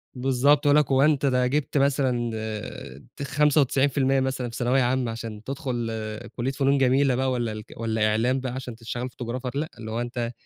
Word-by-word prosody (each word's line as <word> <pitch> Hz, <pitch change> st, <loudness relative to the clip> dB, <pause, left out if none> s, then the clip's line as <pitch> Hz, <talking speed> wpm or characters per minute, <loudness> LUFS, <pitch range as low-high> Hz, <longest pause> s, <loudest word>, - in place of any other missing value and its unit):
بالضبط 135 Hz, +3 st, +3 dB
يقول 145 Hz, 0 st, +5 dB
لك 150 Hz, -2 st, +2 dB
هو 135 Hz, 0 st, +4 dB
أنت 145 Hz, -1 st, +3 dB
ده 125 Hz, -2 st, +2 dB
جبت 145 Hz, +2 st, -1 dB
مثلًا 130 Hz, -4 st, +1 dB, 0.9 s
ت -, -, -4 dB
95% 140 Hz, -1 st, +2 dB
مثلًا 130 Hz, -2 st, -2 dB
في 115 Hz, -, -9 dB
ثانوية 125 Hz, +2 st, +2 dB
عامة، 125 Hz, -1 st, +1 dB
عشان 115 Hz, -2 st, -7 dB
تدخُل 130 Hz, -4 st, -3 dB, 0.4 s
كُلّية 125 Hz, +2 st, -1 dB
فنون 135 Hz, 0 st, +2 dB
جميلة 135 Hz, 0 st, +3 dB
بقى 130 Hz, +1 st, 0 dB
والّا 120 Hz, -3 st, -1 dB
الك 110 Hz, 0 st, -8 dB, 0.2 s
إعلام 110 Hz, +4 st, +2 dB
بقى 130 Hz, -1 st, -4 dB
عشان 130 Hz, -3 st, -6 dB
تشتغل 120 Hz, +2 st, -5 dB
photographer 125 Hz, +1 st, -4 dB
لأ، 150 Hz, +3 st, -2 dB
اللي 110 Hz, -1 st, -6 dB
هو 115 Hz, +2 st, -2 dB
أنت 120 Hz, -1 st, -3 dB
130 Hz, 180 wpm, -25 LUFS, 120-135 Hz, 0.9 s, يقول